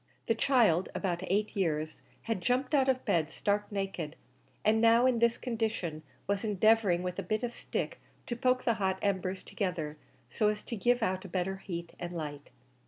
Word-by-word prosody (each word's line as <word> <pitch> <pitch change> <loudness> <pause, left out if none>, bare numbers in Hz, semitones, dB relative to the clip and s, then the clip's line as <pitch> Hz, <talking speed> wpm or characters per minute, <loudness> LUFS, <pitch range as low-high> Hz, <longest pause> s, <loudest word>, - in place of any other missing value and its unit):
The 230 - +3
child, 225 - +3
about 175 -3 -1
eight 205 +4 0
years, 155 -5 -1 0.2
had 225 -5 -2
jumped 255 - 0
out 270 -2 +4
of 260 -1 +1
bed, 160 -2 +2
stark 205 +4 -1
naked, 195 -6 -3 0.5
and 220 +1 +4
now 230 +2 +6
in 255 -2 +3
this 235 0 +3
condition 220 -10 -2 0.2
was 200 +1 -1
endeavouring 210 -3 +3
with 180 +1 -3
a - - +1
bit 215 +5 -2
of 240 -1 -2
stick - - -4 0.3
to 240 - -3
poke 255 +1 +2
the 235 - +3
hot 190 -1 +1
embers 190 -2 -1
together, 170 -7 -3 0.3
so 215 - +1
as 210 0 0
to 235 - -4
give 240 +3 +2
out 185 -2 0
a - - -7
better 190 +1 -1
heat 170 -3 -6
and 175 0 -5
light. 145 -2 -6
200 Hz, 185 wpm, -31 LUFS, 175-230 Hz, 0.5 s, now